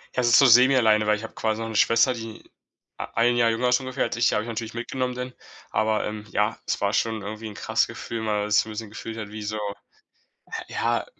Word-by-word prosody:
Ja, 125 - +2
es 120 - +2
ist 115 - +7
so 135 - +7
semi-alleine, 120 -3 +5
weil 105 0 +2
ich 110 - -9
hab 110 - -9
quasi 110 0 -1
noch 115 - -3
'ne 110 - -6
Schwester, 115 +4 +4
die 115 -1 -9 0.5
a - - -4
1 120 +2 +3
Jahr 115 -1 +4
jünger 125 +2 0
ist 125 +1 +4
ungefähr 130 0 -2
als - - -3
ich, 120 - +3
die - - +1
habe 105 - 0
ich - - -9
natürlich 115 0 -5
mitgenommen 125 +2 -3
denn. 125 0 -5 0.4
Aber, 110 0 +1
ähm, 105 0 -6
ja, 105 +2 0
es - - -2
war 100 0 +1
schon 110 0 0
irgendwie 110 +2 -6
'n 105 - -8
krasses - - 0
Gefühl, 115 -1 -6
weil 105 -1 0
man 105 0 -4
sich - - +5
so - - -11
'n - - -6
bisschen 110 0 -6
gefühlt 110 +1 -7
hat 105 -2 -6
wie 105 0 -7
so 110 +1 -3 1.1
ja, - - -1
115 Hz, 255 wpm, -25 LUFS, 105-120 Hz, 1.1 s, ist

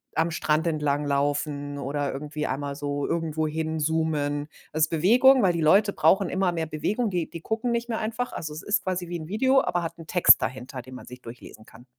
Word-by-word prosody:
am 165 +1 +1
Strand 155 +1 0
entlanglaufen 145 -1 -1
oder 140 +1 -2
irgendwie 150 +2 -5
einmal 140 +1 -3
so 145 0 -3
irgendwo 160 -2 -1
hin 160 +1 -3
zoomen. 150 -2 -1 0.2
Also, 155 0 +2
Bewegung, 245 - +5
weil 185 -2 +3
die 170 - -2
Leute 200 +6 +4
brauchen 195 -2 +3
immer 190 -1 +1
mehr 165 -2 -2
Bewegung, 205 +10 -1
die 175 -4 -2
die 170 - -8
gucken 225 +6 -2
nicht 235 0 -1
mehr 225 - -2
einfach. 230 +3 -3
Also, 155 - -5
es 155 - -8
ist 205 - 0
quasi 180 -1 -3
wie 175 - -4
'n 155 0 -9
Video, 260 +6 +3
aber 175 0 -1
hat 165 - -5
'n 165 -2 -12
Text 180 +1 +6
dahinter, 125 +2 -5
den 130 +1 -12
man 125 - -10
sich 125 0 -11
durchlesen 115 -2 -12
kann. 115 +2 -17
160 Hz, 210 wpm, -25 LUFS, 145-185 Hz, 0.2 s, Text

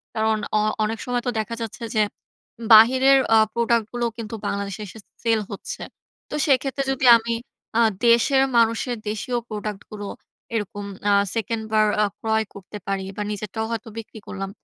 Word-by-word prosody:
কারণ 220 0 +2 0.2
অ - - +4 0.2
অনেক 215 +1 -2
সময় 245 -1 -1
তো - - +3
দেখা 230 +2 -3
যাচ্ছে 225 +1 -6
যে 215 - +4 0.7
বাহিরের 260 +5 +7 0.2
আ - - +7 0.2
প্রোডাক্ট 235 -1 +2
গুলোও 240 -1 0
কিন্তু 225 -1 -5
বাংলাদেশে 200 0 -3
এসে 220 - -11 0.2
সেল 225 -1 +3
হচ্ছে। 200 - -7 0.5
তো - - -4
সেক্ষেত্রে 275 0 +1
যদি 265 0 -1
আমি 230 +1 -3 0.5
আ - - +6 0.3
দেশের 265 +4 +5
মানুষের 230 +2 +2
দেশীয় 240 +4 -2
প্রোডাক্ট 210 -1 -4
গুলো 205 -1 -6 0.5
এরকম 205 -1 -3 0.2
আ - - +5 0.2
সেকেন্ড 225 0 -2
বার 215 0 +4 0.2
আ - - +4
ক্রয় 220 0 +1
করতে 200 +1 -9
পারি 195 -1 -1
বা - - -2
নিজেরটাও 215 +2 -4
হয়তো 230 0 -4
বিক্রি 225 0 -8
করলাম। 195 -1 -5
220 Hz, 165 wpm, -23 LUFS, 210-235 Hz, 0.7 s, বাহিরের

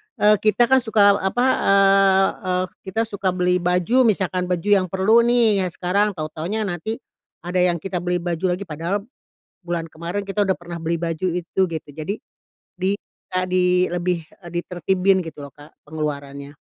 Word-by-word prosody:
eee, 210 0 +5
kita 215 +2 +3
kan 265 - +7
suka, 210 -4 +4
eee, - - -7
apa, 245 +6 +1
eee 195 -1 +4 0.2
eee, 180 0 +1 0.2
kita 220 +4 -1
suka 200 -4 -2
beli 180 0 +2
baju, 180 +9 +2
misalkan 185 -3 0
baju 180 +2 -2
yang 185 - -2
perlu 190 +6 +3
nih 230 -4 +3
yang - - -4
sekarang, 195 +4 0
tahu-tahunya 160 +7 -3
nanti 200 +3 -3 0.5
ada 180 +1 -1
yang 180 -1 +3
kita 190 -2 -2
beli 180 0 -1
baju 175 +1 0
lagi 195 - -7
padahal 170 +4 -3 0.6
bulan 170 -1 -3
kemarin 170 +5 -5
kita 200 +1 0
udah 190 -2 0
pernah 175 -1 -8
beli 165 +1 -1
baju 165 +2 -2
itu 175 +2 -4
gitu. 160 -2 -6
Jadi 160 +7 -4 0.6
di, 185 +1 0 0.4
eee, 185 0 0
di 185 0 +1 0.2
lebih, 175 -2 -2 0.2
eee, 175 - -9
ditertibin 185 +2 +1
gitu 160 -2 -9
loh, 140 -1 -10
Kak, 145 +1 -15 0.2
pengeluarannya. 140 -2 -5
180 Hz, 175 wpm, -22 LUFS, 170-200 Hz, 0.6 s, kan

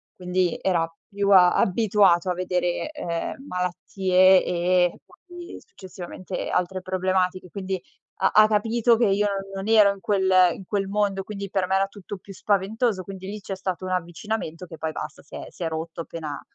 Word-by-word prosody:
quindi 180 -1 -1
era 165 -3 0 0.2
più 200 -1 -1
a 180 -2 +7
abituato 190 -3 +3
a - - +1
vedere, 180 - -1
ehm, 220 - -5
malattie 185 +1 +3
e 180 0 +1
poi, 350 -1 -12
successivamente, 185 - -7
altre 185 +1 -1
problematiche. 185 0 -1
Quindi 190 -2 -3 0.4
ha 190 - +2
ha 215 0 +7
capito 225 +2 +2
che 235 - +3
io 205 +1 +2 0.3
non 195 - -4
non - - -5
ero 210 -3 +6
in 195 - -14
quel 190 -2 +1 0.2
in 190 - -11
quel 200 -1 -1
mondo, 200 -1 0
quindi 200 -1 -6
per 190 -2 0
me 190 - +1
era 195 0 +3
tutto 200 0 -9
più 195 +2 -12
spaventoso. 205 +1 0
Quindi 190 0 -8
lì 210 +1 -5
c'è 195 -1 -5
stato 185 -1 -4
un 185 - -4
avvicinamento 180 0 -3
che 165 -2 -11
poi 160 0 -2
basta 150 - -7
si - - -13
è - - -6
si - - -17
è - - 0
rotto 160 +1 -5
appena, 155 -4 -6
190 Hz, 180 wpm, -24 LUFS, 180-200 Hz, 0.4 s, a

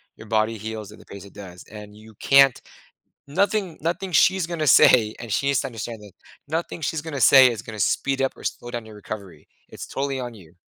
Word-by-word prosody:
your 110 - -13
body 110 +1 0
heals 110 -1 -7
in 105 - -15
the - - -17
pace 100 -1 -11
it 100 - -16
does. 95 -3 -11
And 105 -1 -11
you 110 0 -16
can't 135 -2 +5 0.7
nothing 195 +3 -1
nothing 175 +3 -3
she's 185 +1 +3
gonna 160 -3 -3
say, 110 -4 +6
and 115 -3 -8
she 140 - 0
needs 140 -2 +2
to - - -4
understand 115 -1 -7
that 100 -3 -14 0.3
nothing 165 +2 -4
she's 150 +2 -2
gonna 145 -5 -5
say 130 +2 +7
is 110 -2 -6
gonna 110 -2 -9
speed 135 +7 0
up 135 - 0
or - - -14
slow 120 - -5
down 120 -2 -5
your 110 -1 -13
recovery. 100 -3 -9 0.2
It's - - -9
totally 135 -1 -3
on 120 -2 -6
you. 85 -5 -17
120 Hz, 220 wpm, -23 LUFS, 105-140 Hz, 0.7 s, say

